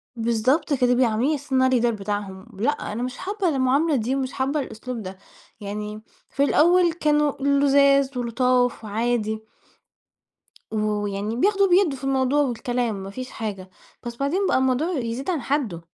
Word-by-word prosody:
بالضبط 235 +7 +1
كده. 250 -2 +3
بيعاملوني 240 -2 +2
على - - +1
أساس 285 -1 -10
إن 260 -1 +3
أنا 260 - +4
الLeader 240 -1 +2
بتاعهم، 195 -1 -4
ب 195 - -10
لأ، 245 - +2 0.2
أنا 225 +4 -3
مش 250 0 -5
حابّة 400 0 -2
المعاملة 280 +3 +2
دي 250 +2 0
ومش 265 -1 -3
حابة 275 +3 -1
الأسلوب 250 -2 -6
ده. 190 -1 -8 0.4
يعني 210 +1 -5 0.3
في 280 - 0
الأول 345 +3 +4
كانوا 300 -2 +2
لُذاذ 280 -1 +3
ولُطاف 245 0 +1
وعادي 220 0 -1 1.3
و 220 - -2 0.3
ويعني 205 +2 -3
بياخدوا 395 - +3
وبيدّوا 355 -6 +3
في 260 - -15
الموضوع 270 +1 +2
والكلام 245 -3 -1
ما 195 0 -7
فيش 255 +5 -7
حاجة، 195 -4 -6 0.4
بس 235 - -5
بعدين 310 +10 0
بقى - - +2
الموضوع 260 +6 +1
يزيد 240 +4 -3
عن 335 -6 -1
حدُّه. 240 - -2
255 Hz, 165 wpm, -23 LUFS, 220-280 Hz, 1.3 s, أنا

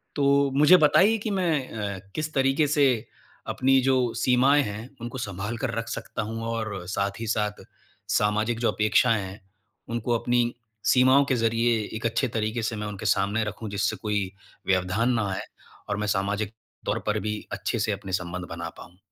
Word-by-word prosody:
तो 140 -1 +3
मुझे 150 +6 +7
बताइए 190 +8 +5
कि 215 0 -3
मैं 165 -8 0
अ, 100 -3 -4 0.2
किस 155 0 -3
तरीके 135 +2 +2
से 140 -3 +4 0.5
अपनी 135 +1 +3
जो 135 +1 +3 0.2
सीमाएँ 130 +4 +4
हैं, 110 +3 -6
उनको 120 +2 -5
सँभाल 105 +2 -4
कर 125 0 -2
रख 115 0 -3
सकता - - -4
हूँ 115 0 -4
और 110 -5 -3
साथ 100 0 -2
ही 115 - -4
साथ 105 -1 -1 0.5
सामाजिक 110 +3 +1
जो 120 - +2
अपेक्षाएँ 110 +1 +3
हैं, 95 +2 -8 0.5
उनको 120 0 0
अपनी 120 0 +2 0.5
सीमाओं 130 +2 +5
के 130 - +3
ज़रिए 115 0 +2 0.2
एक 115 - -7
अच्छे 115 +4 +1
तरीके 110 +1 -2
से 115 - -1
मैं 105 0 -4
उनके 100 -2 -7
सामने 100 +3 +2
रखूँ 105 +1 -5
जिससे 105 +2 0
कोई 105 -2 -2 0.4
व्यवधान 95 +6 +2
ना 110 -4 0
आए 95 - -3 0.5
और 105 - -1
मैं 105 - -2
सामाजिक 100 +1 -1 0.3
तौर - - 0
पर 105 0 +1
भी 105 0 -2
अच्छे 115 - -2
से 110 0 0
अपने 100 -1 -5
संबंध 90 0 -5
बना - - -5
पाऊँ? 90 - -13
115 Hz, 180 wpm, -26 LUFS, 105-130 Hz, 0.5 s, मुझे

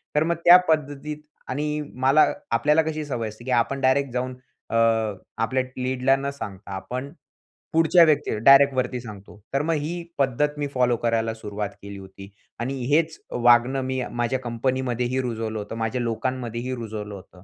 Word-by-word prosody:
तर 150 - +4
मग 170 +1 0
त्या 175 +1 +10
पद्धतीत 150 -1 -1 0.3
आणि 150 +3 -2 0.2
मला 140 +4 +6 0.3
आपल्याला 150 +7 +3
कशी 155 -1 -3
सवय 120 -6 -3
असते, 110 +3 -13
की 130 - -3
आपण 125 +3 +1
डायरेक्ट 130 0 +2
जाऊन 125 0 -2 0.4
अ, - - -1 0.7
आपल्या 130 +3 0 0.2
लीडला 130 +1 +2
न 140 +1 -3
सांगता, 105 -7 -8
आपण, 125 +8 -5 0.6
पुढच्या 165 +2 +6
व्यक्तीला, 150 -7 +1
डायरेक्ट 140 0 +8
वरती 125 -1 -1
सांगतो. 105 -2 -11
तर 135 - +2
मग 165 +2 0
ही 170 +4 -4 0.2
पद्धत 145 +3 +1
मी 145 - -1
फॉलो 125 -2 +2
करायला 115 -1 0
सुरुवात 105 -2 -5
केली 100 0 -8
होती. 95 0 -12 0.3
आणि 130 +3 -2 0.2
हेच 160 0 +2
वागणं 120 +2 +4
मी 130 0 -2 0.2
माझ्या 130 +2 0
कंपनीमध्येही 125 +1 -1
रुजवलं 115 -3 -3
होतं, 105 +2 -6
माझ्या 115 +2 -2
लोकांमध्येही 120 +1 -3
रुजवलं 110 -3 -6
होतं. 90 -1 -14
130 Hz, 160 wpm, -24 LUFS, 115-140 Hz, 0.7 s, त्या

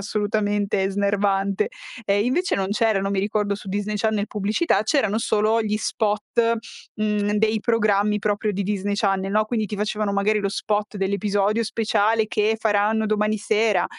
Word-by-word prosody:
assolutamente 205 -1 0
snervante. 200 -1 0 0.4
Ehm, 205 0 +2
invece 345 +9 +1
non 190 -1 -1
c'erano, 210 -3 +1
mi 200 - -1
ricordo, 205 0 0
su 205 - -13
Disney 205 +2 -2
Channel 215 -1 0
pubblicità, 210 - 0
c'erano 220 -5 +1
solo 220 0 +1
gli 210 0 -1
spot, 210 -1 -1 0.7
mhmm, 210 -1 0
dei 215 +1 +2
programmi 210 -2 +2
proprio 210 +1 0
di 200 +1 -2
Disney 205 0 -2
Channel, 195 -2 0
no, 215 +1 +3
quindi 220 -2 -1
ti 210 - -5
facevano, 210 0 -1
magari, 205 +2 +1
lo 200 -1 -1
spot 210 +1 -2
dell'episodio 200 +3 0
speciale 220 0 +1
che 215 +1 +1
faranno 215 0 +1
domani 215 0 +1
sera, 215 -1 +1
210 Hz, 155 wpm, -23 LUFS, 200-215 Hz, 0.7 s, no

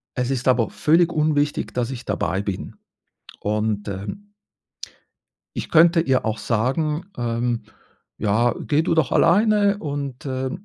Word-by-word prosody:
Es 125 0 -1
ist 130 -1 -2
aber 125 -3 +3
völlig 170 +3 +3
unwichtig, 150 -1 0
dass 125 0 -1
ich 125 -2 -7
dabei 90 +4 -1
bin. 100 -3 -5 0.6
Und, 105 0 -1
ähm 105 - -7 1.2
ich - - -4
könnte 165 +1 +6
ihr 130 -7 +1
auch 110 -1 -1
sagen: 150 +10 -1
„Ähm, 120 0 -1 0.6
ja, 110 +3 +2
geh 155 +1 +1
du 165 - +1
doch 155 -6 +1
alleine“ 205 +2 +4
und, 140 -3 -5
äh 130 0 -2
130 Hz, 135 wpm, -22 LUFS, 115-160 Hz, 1.2 s, könnte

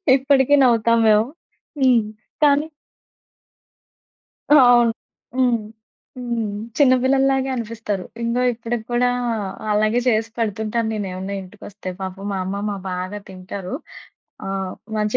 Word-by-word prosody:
ఇప్పటికి 275 +1 +3
నవ్వుతాం 230 -2 +4
మేము. 215 0 +5 0.6
హ్మ్. 245 -4 +5 0.4
కానీ 290 +1 +4 1.8
అవును. 245 -5 +6 0.4
హ్మ్. 250 -2 +3 0.6
హ్మ్. 235 -3 -2 0.3
చిన్న 265 -3 +6
పిల్లల్లాగే 270 0 +2
అనిపిస్తారు. 220 -5 -4 0.2
ఇంగో 235 +2 0
ఇప్పటిక్కూడా 240 +1 -1 0.6
అలాగే 215 +3 +2
చేసి 225 -1 +1
పెడుతుంటాను 220 +1 -1
నేను 205 -2 -3
ఏవన్నా 190 +2 -5
ఇంటికొస్తే. 195 0 -9
పాపం 190 +1 -6
మా 195 - -2
అమ్మమ్మ 200 +2 -3 0.2
బాగా 185 +3 -4
తింటారు. 185 +2 -7 0.7
ఆ! - - -4 0.5
మంచి 210 0 +1
230 Hz, 105 wpm, -21 LUFS, 205-250 Hz, 1.8 s, అవును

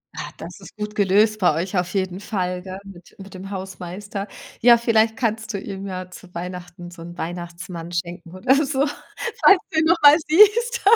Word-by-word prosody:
Ah - - -5
,das 170 +4 -9
ist 190 -2 -14
gut 210 0 -5
gelöst 210 +2 +3
bei 180 -5 +4
euch 180 +4 -2
auf 180 0 -1
jeden 190 -2 -2
Fall, 180 -3 -3
gell, 190 0 -7
mit 185 -3 -14
mit 195 -1 -12
dem 190 +1 -8
Hausmeister. 190 +1 -6 0.3
Ja, 235 0 +7
vielleicht 225 -1 +2
kannst 225 -2 -2
du 200 - -2
ihm 195 0 -7
ja 185 -1 -6
zu 180 0 -14
Weihnachten 175 0 -7
so 170 -1 -12
'n 175 +1 -10
Weihnachtsmann 170 0 -6
schenken 170 0 -5
oder 250 +8 +3
so, 275 0 +1 0.6
falls 390 -2 +7
du 315 - +1
ihn 315 - +2
noch 335 +1 +4
mal 290 +1 +9
siehst. 435 +8 +5
190 Hz, 190 wpm, -22 LUFS, 180-220 Hz, 0.6 s, mal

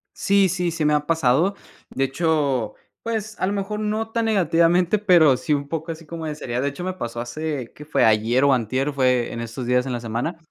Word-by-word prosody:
Sí, 200 0 +3
sí, 180 0 -1
sí 165 -2 -2
me 150 - +3
ha 150 0 +1
pasado. 160 +4 +2 0.3
De 135 - -1
hecho, 135 -5 0 0.3
pues, 220 -2 -4
a - - 0
lo 200 - -1
mejor, 205 +1 -3
no 215 +1 -2
tan 230 0 0
negativamente, 175 -1 +2
pero 175 -9 +5
sí, 150 - -1
un 140 0 -4
poco 165 +2 -4
así 165 0 -9
como 160 +1 -6
de 150 - -4
seriedad. 125 -4 -3
De 140 - 0
hecho, 140 +5 -8
me 185 +1 -2
pasó 120 -10 -5
hace, 135 +1 -4
¿qué 150 - -11
fue?, 150 - +2
ayer 110 +4 +3
o 140 -1 +5
antier, 130 +4 -1
fue 125 -3 +1
en 115 - -5
estos 115 +2 -6
días 125 +1 +2
en - - -3
la 120 - -2
semana. 120 +9 -3
155 Hz, 230 wpm, -22 LUFS, 130-180 Hz, 0.3 s, pero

